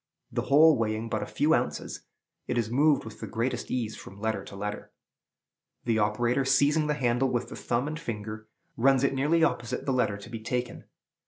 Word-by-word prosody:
The - - -1
whole 150 0 +6
weighing 110 0 -1
but - - -1
a - - -4
few - - +2
ounces, - - -2 0.4
it - - -1
is 115 -1 0
moved 145 +2 +3
with 110 -1 -10
the - - -6
greatest 115 +3 -2
ease 115 -3 -2
from 100 - -11
letter 110 +1 -1
to - - -10
letter. 105 +1 -5 0.9
The 115 -2 +2
operator, 120 +5 +1
seizing 145 +3 +3
the 150 - +1
handle 125 -1 +1
with 125 -1 -2
the - - -7
thumb 120 +3 -1
and 155 +1 -4
finger, 110 -5 -6 0.3
runs 135 +2 +3
it 140 - +2
nearly 150 +5 +2
opposite 120 -7 -1
the 135 - +1
letter 125 -5 +1
to 100 +3 -11
be 115 - -5
taken. 125 +2 -3
120 Hz, 195 wpm, -28 LUFS, 110-135 Hz, 0.9 s, whole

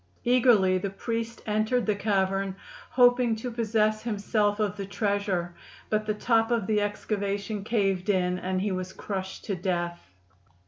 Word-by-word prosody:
Eagerly 230 -7 +4
the 200 - -2
priest 230 +3 -4
entered 215 +3 +1
the 210 - +2
cavern, 195 -2 0 0.3
hoping 245 -2 +4
to 240 +3 -5
possess 215 -2 +1
himself 210 -1 0
of 210 -2 0
the 200 -1 -5
treasure, 200 -3 -1 0.4
but 215 0 0
the 215 - +1
top 225 +1 +2
of 230 -4 +1
the 210 +1 +1
excavation 205 0 -2
caved 195 -3 0
in 180 -2 +1
and 185 +1 -1
he 205 0 0
was 185 0 -4
crushed 190 -2 -5
to 205 - -2
death. 175 - -3
205 Hz, 150 wpm, -27 LUFS, 190-225 Hz, 0.4 s, Eagerly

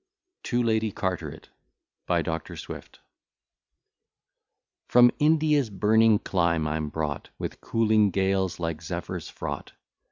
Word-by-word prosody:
TO 120 0 0
LADY 110 -2 +1
CARTERET 85 -5 -4 0.6
BY - - +2
DR. 80 -1 -4
SWIFT - - -9 1.9
FROM 120 0 +6
India's 150 -4 +3
burning 110 +2 +4
clime 85 -5 0
I'm 75 0 -2
brought, 75 -2 -4
With - - -6
cooling 110 -2 +3
gales 95 -1 0
like 85 -2 -3
zephyrs 80 - -5
fraught. - - -6
95 Hz, 105 wpm, -26 LUFS, 80-115 Hz, 1.9 s, FROM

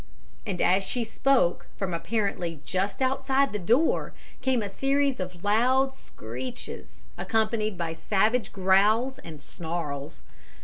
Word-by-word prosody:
And 185 -3 -1
as 190 +2 +4
she 240 +5 -1
spoke, 245 -4 +2
from 190 -3 -3
apparently 175 -3 -2
just 195 +7 -1
outside 270 -1 +1
the 210 - -2
door, 235 - +2 0.3
came 255 -4 +1
a - - -2
series 275 +5 +1
of 180 -1 -6
loud 255 +6 +3
screeches, 110 - -7 0.2
accompanied 215 -2 0
by 165 -1 -2
savage 210 +6 +1
growls 205 +7 +3
and 155 -3 -10
snarls. 145 - -5
200 Hz, 125 wpm, -27 LUFS, 170-250 Hz, 0.3 s, as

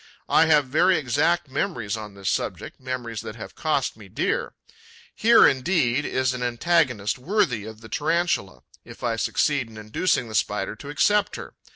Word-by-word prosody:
I 160 - +4
have 150 -3 +4
very 175 +7 +3
exact 155 +5 +1
memories 130 - -2
on 105 -2 -8
this 100 -1 -7
subject, - - -4
memories 125 -4 -4
that 110 - -8
have 110 - -9
cost 155 -5 -1
me 105 -3 -14
dear. 100 - -2 0.6
Here 230 +1 +6
indeed 135 -1 +1
is 130 0 0
an 125 - -5
antagonist 125 -3 +1
worthy 125 - 0
of 110 0 -10
the 115 - -11
Tarantula, 160 - -1 0.2
if - - -13
I 115 - 0
succeed 130 +2 0
in 110 - -13
inducing 110 +7 0
the 110 - -9
Spider 105 -1 -1
to 140 - -10
accept 205 +7 +2
her. - - -8
130 Hz, 170 wpm, -24 LUFS, 110-160 Hz, 0.6 s, Here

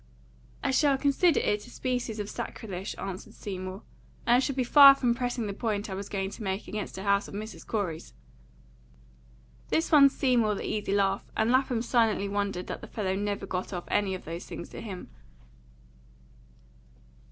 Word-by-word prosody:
"I - - +1
should 275 0 +3
consider 290 +4 +3
it 210 0 -1
a - - -12
species 245 -4 -3
of 205 - -3
sacrilege," 195 -2 -5
answered 190 -1 -7
Seymour, 185 0 -6 0.4
"and 240 0 +5
I - - +4
shall 270 0 -1
be 260 - +1
far 275 +2 +9
from 245 -3 +1
pressing 245 -1 -2
the 200 - -3
point 210 -2 -2
I - - -2
was 195 +1 -5
going 195 -1 -2
to - - -10
make 195 0 -3
against 210 -3 -5
a 190 - -5
house 200 0 +2
of - - -9
Mrs. 215 +2 -7
Corey's." 185 -8 -3 1.5
This 325 - +1
won 285 -3 +8
Seymour 240 -6 +2
the - - -5
easy 210 -2 -2
laugh, 195 -1 +1
and 220 +2 +2
Lapham 255 -3 +2
silently 225 -4 +2
wondered 200 -2 -2
that - - -6
the 230 - -9
fellow 200 -4 -2
never 205 0 -2
got 185 0 -4
off 175 -1 -4
any 195 -2 +1
of 185 - -10
those 165 +2 -6
things 170 - -7
to - - -8
him. 195 -5 -8
210 Hz, 180 wpm, -28 LUFS, 195-245 Hz, 1.5 s, far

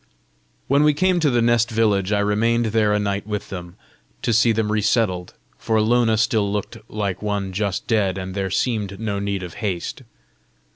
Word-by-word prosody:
When 140 +2 +3
we 150 -1 +4
came 185 +2 +2
to 155 -3 +3
the 120 -2 +2
nest 120 -1 +3
village, 105 -4 +1
I 105 -1 +2
remained 115 +3 +1
there 110 -2 +3
a 105 - +3
night 100 0 -2
with 105 -1 -4
them, 90 -2 -7 0.5
to 115 - +1
see 115 +1 +4
them 110 -1 0
resettled; 105 -4 0 0.2
for 110 -1 +1
Lona 115 0 +3
still 110 -2 +1
looked 105 -1 -3
like 100 -3 -3
one 100 -2 -2
just 100 -1 -2
dead, 100 -5 +1
and 95 0 -5
there 95 0 -2
seemed 100 -2 -1
no 105 -3 -2
need 100 -1 -2
of 90 -2 -7
haste. 95 -5 -3
105 Hz, 185 wpm, -22 LUFS, 100-115 Hz, 0.5 s, we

